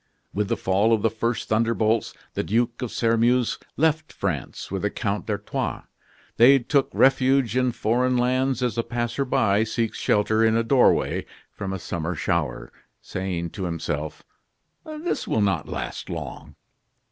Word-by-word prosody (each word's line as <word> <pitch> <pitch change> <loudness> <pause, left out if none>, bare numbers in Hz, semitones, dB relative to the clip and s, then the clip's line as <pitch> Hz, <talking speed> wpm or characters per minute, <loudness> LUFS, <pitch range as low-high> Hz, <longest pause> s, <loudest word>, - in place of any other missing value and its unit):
With 105 0 0
the - - 0
fall 100 +4 +2
of 110 - +1
the 115 - +3
first 115 +1 -2
thunder 115 +2 +2
bolts, 110 0 +1 0.2
the - - -1
Duke 120 +3 0
of 125 - -3
Sairmeuse 115 +1 +2 0.2
left 155 0 +1
France 85 -6 -4
with 95 -1 -2
the 105 - 0
Count 105 0 -3
d'Artois. 105 -1 -3 0.5
They 130 +4 +8
took 135 +2 +1
refuge 135 -3 +3
in 125 -1 +2
foreign 125 +3 +1
lands 130 +1 +1
as 120 -2 -1
a - - +1
passer 120 +3 -2
by 105 -4 +2
seeks 115 0 -2
shelter 110 +2 +2
in 110 0 +4
a 115 - +2
doorway 125 +2 +3 0.2
from 95 -2 -5
a 95 - -2
summer 85 -1 -4
shower, - - -2 0.3
saying 90 -3 -4
to 95 -3 -5
himself: 80 -3 -4 0.6
"This 310 +2 -3
will - - +1
not 95 -6 0
last - - -5
long." - - -7
115 Hz, 160 wpm, -24 LUFS, 100-125 Hz, 0.6 s, They